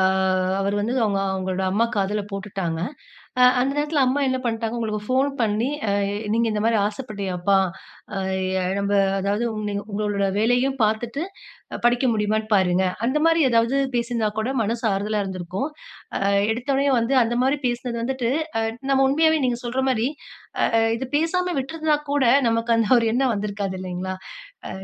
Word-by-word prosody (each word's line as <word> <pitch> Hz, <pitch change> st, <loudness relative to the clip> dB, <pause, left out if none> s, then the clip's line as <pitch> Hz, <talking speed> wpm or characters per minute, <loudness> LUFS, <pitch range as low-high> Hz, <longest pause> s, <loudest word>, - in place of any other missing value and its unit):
ஆ, -, -, +4 dB, 0.5 s
அவரு 200 Hz, +1 st, 0 dB
வந்து, 225 Hz, +5 st, -1 dB
அவங்க 200 Hz, -2 st, 0 dB, 0.2 s
உங்களோட 185 Hz, 0 st, -2 dB
அம்மா 210 Hz, +5 st, +2 dB
காதுல 205 Hz, +1 st, 0 dB
போட்டுட்டாங்க. 195 Hz, -4 st, -4 dB, 0.8 s
அந்த 260 Hz, +2 st, +1 dB
நேரத்துல 295 Hz, 0 st, +1 dB
அம்மா 265 Hz, +3 st, +1 dB
என்ன 260 Hz, 0 st, 0 dB
பண்ணிட்டாங்க, 225 Hz, 0 st, -2 dB
உங்களுக்கு 215 Hz, -2 st, -2 dB
ஃபோன் 265 Hz, +2 st, +2 dB
பண்ணி, 220 Hz, +3 st, +1 dB, 0.2 s
"அ, -, -, +2 dB, 0.4 s
நீங்க 230 Hz, +1 st, +2 dB
இந்த 210 Hz, 0 st, -1 dB
மாதிரி 225 Hz, -1 st, +3 dB
ஆசைப்பட்டியப்பா? 200 Hz, -4 st, -1 dB, 0.6 s
அ, -, -, -2 dB, 0.6 s
நம்ப 200 Hz, 0 st, 0 dB, 0.3 s
அதாவது, 200 Hz, +4 st, 0 dB, 0.2 s
நீங்க 200 Hz, 0 st, -3 dB
உங்களோட 200 Hz, -1 st, -1 dB
வேலையும் 245 Hz, +5 st, +2 dB
பார்த்துட்டு, 230 Hz, +6 st, -1 dB, 0.6 s
படிக்க 240 Hz, +2 st, +3 dB
முடியுமான்னு 215 Hz, +1 st, 0 dB
பாருங்க." 185 Hz, -1 st, +3 dB, 0.2 s
அந்த 265 Hz, +5 st, +1 dB
மாதிரி 330 Hz, 0 st, +4 dB
ஏதாவது 230 Hz, +3 st, +2 dB, 0.2 s
பேசிருந்தா 235 Hz, -2 st, 0 dB
கூட 220 Hz, -, -2 dB
மனசு 230 Hz, +3 st, -2 dB
ஆறுதலா 205 Hz, +2 st, -1 dB
இருந்திருக்கும். 185 Hz, -, -4 dB, 0.5 s
அ, -, -, +1 dB, 0.3 s
எடுத்த 240 Hz, +4 st, -4 dB
உடனே 280 Hz, +1 st, +2 dB
வந்து 230 Hz, +4 st, 0 dB
அந்த 235 Hz, +1 st, 0 dB
மாதிரி 270 Hz, +3 st, +2 dB
பேசினது 240 Hz, 0 st, -2 dB
வந்துட்டு, 250 Hz, -1 st, -1 dB, 0.3 s
அ, -, -, 0 dB, 0.3 s
நம்ம 270 Hz, 0 st, +4 dB
உண்மையாவே 315 Hz, +2 st, +3 dB
நீங்க 245 Hz, -1 st, 0 dB
சொல்ற 240 Hz, +2 st, -2 dB
மாதிரி, 240 Hz, -2 st, +1 dB, 0.7 s
ஆ, -, -, +5 dB, 0.2 s
இது 265 Hz, -, -4 dB
பேசாம 360 Hz, +3 st, 0 dB
விட்டுருந்தா 310 Hz, +2 st, 0 dB
கூட, 285 Hz, -2 st, +2 dB, 0.3 s
நமக்கு 230 Hz, +1 st, +1 dB
அந்த 225 Hz, -2 st, +1 dB
ஒரு 230 Hz, -, 0 dB
எண்ணம் 255 Hz, 0 st, +2 dB
வந்திருக்காது. 200 Hz, -1 st, -3 dB
இல்லையாங்க? 185 Hz, 0 st, -4 dB, 0.6 s
அ, -, -, -7 dB
230 Hz, 155 wpm, -23 LUFS, 200-260 Hz, 0.8 s, ஆ